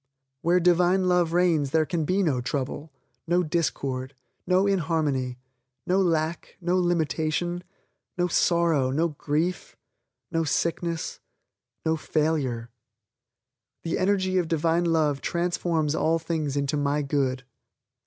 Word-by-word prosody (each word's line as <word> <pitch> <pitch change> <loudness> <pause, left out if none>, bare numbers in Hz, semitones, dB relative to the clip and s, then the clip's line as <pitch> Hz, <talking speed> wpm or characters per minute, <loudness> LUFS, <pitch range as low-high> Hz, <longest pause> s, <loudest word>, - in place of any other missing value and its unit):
Where 175 +2 +3
Divine 180 +2 +3
Love 180 -2 +2
reigns 170 -5 +2
there 155 +2 +2
can 165 -1 -1
be 190 +5 +1
no 140 -8 +1
trouble, 140 +3 -4 0.4
no 175 +2 +3
discord, 135 -5 -2 0.3
no 185 +2 +3
inharmony, 155 -9 0 0.5
no 190 +2 +2
lack, 165 -2 -1
no 180 0 0
limitation, 175 0 0 0.5
no 175 0 +2
sorrow, 170 -6 +2
no 160 +6 +1
grief, 155 +4 -2 0.5
no 165 0 +1
sickness, 165 +2 -2 0.7
no 160 0 +2
failure. 145 -8 -1 1.1
The 165 - -1
energy 185 -1 +2
of 175 - -1
Divine 165 +2 +1
Love 155 -4 +1
transforms 170 -3 0
all 160 0 +2
things 160 -4 -2
into 140 +1 0
my 145 +1 0
Good. 135 -2 -1
165 Hz, 120 wpm, -26 LUFS, 145-175 Hz, 1.1 s, Where